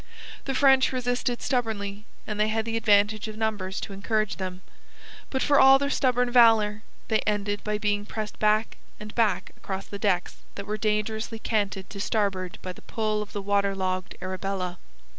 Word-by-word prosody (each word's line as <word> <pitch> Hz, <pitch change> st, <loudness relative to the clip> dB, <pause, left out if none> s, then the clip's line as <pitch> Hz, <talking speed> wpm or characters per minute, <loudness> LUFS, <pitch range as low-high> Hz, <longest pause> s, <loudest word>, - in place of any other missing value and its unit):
The 270 Hz, -, -2 dB
French 265 Hz, -1 st, +5 dB
resisted 245 Hz, -1 st, -1 dB
stubbornly, 215 Hz, -5 st, -2 dB, 0.2 s
and 210 Hz, -1 st, -4 dB
they 215 Hz, -, +3 dB
had 220 Hz, 0 st, -1 dB
the 225 Hz, 0 st, -2 dB
advantage 210 Hz, -1 st, +3 dB
of 215 Hz, 0 st, -7 dB
numbers 210 Hz, -4 st, -2 dB
to 200 Hz, -, -6 dB
encourage 215 Hz, +1 st, -1 dB
them. 185 Hz, -1 st, -5 dB, 0.7 s
But 265 Hz, -, -1 dB
for 285 Hz, -1 st, +4 dB
all 270 Hz, 0 st, +8 dB
their 280 Hz, +1 st, -1 dB
stubborn 250 Hz, -3 st, +2 dB
valour, 225 Hz, -3 st, +5 dB, 0.3 s
they 220 Hz, -1 st, +2 dB
ended 205 Hz, -1 st, -1 dB
by 210 Hz, 0 st, -1 dB
being 205 Hz, -1 st, -1 dB
pressed 215 Hz, -1 st, -5 dB
back 215 Hz, +1 st, +2 dB, 0.2 s
and 210 Hz, 0 st, -8 dB
back 225 Hz, -3 st, +1 dB
across 195 Hz, 0 st, -5 dB
the 200 Hz, -, -8 dB
decks 185 Hz, -4 st, 0 dB, 0.2 s
that 200 Hz, -, -6 dB
were 210 Hz, +1 st, -3 dB
dangerously 220 Hz, +1 st, -1 dB
canted 200 Hz, -4 st, -1 dB
to 200 Hz, -, -7 dB
starboard 195 Hz, -4 st, -1 dB
by 185 Hz, -, -5 dB
the -, -, -15 dB
pull 215 Hz, -1 st, -1 dB
of 210 Hz, -, -7 dB
the 205 Hz, -, -5 dB
water 200 Hz, 0 st, +1 dB
logged 185 Hz, -1 st, -2 dB
Arabella. 185 Hz, -1 st, -3 dB
210 Hz, 180 wpm, -26 LUFS, 200-225 Hz, 0.7 s, all